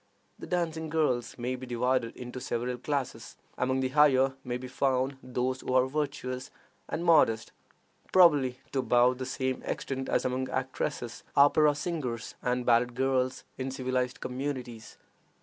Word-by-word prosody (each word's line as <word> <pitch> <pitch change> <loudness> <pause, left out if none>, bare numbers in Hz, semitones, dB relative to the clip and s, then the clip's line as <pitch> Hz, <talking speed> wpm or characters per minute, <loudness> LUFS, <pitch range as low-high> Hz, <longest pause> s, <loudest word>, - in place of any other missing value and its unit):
The - - -8
dancing 160 -3 -1
girls 130 -7 0
may 125 +1 -2
be 130 0 -8
divided 125 0 0
into 125 +1 -7
several 125 +1 -2
classes. 140 0 -3 0.2
Among 130 +1 0
the 130 - 0
higher 135 -2 +4
may 125 -1 -3
be 130 +1 -7
found 130 +1 0
those 130 +1 -2
who 130 - -2
are 130 0 +5
virtuous 135 -2 -3 0.4
and 170 - -3
modest, 115 -10 +4 0.6
probably 145 -9 +5
to 135 - 0
about 125 0 +3
the 130 - -3
same 130 0 -2
extent 135 -1 -4
as - - +1
among 130 +1 -1
actresses, 130 -2 -3
opera 145 +1 +5
singers, 145 -7 -3
and 125 0 -1
ballet 120 0 +5
girls 130 +1 0 0.2
in 130 0 -2
civilized 130 +1 -2
communities. 125 -4 -5
130 Hz, 150 wpm, -29 LUFS, 125-140 Hz, 0.6 s, are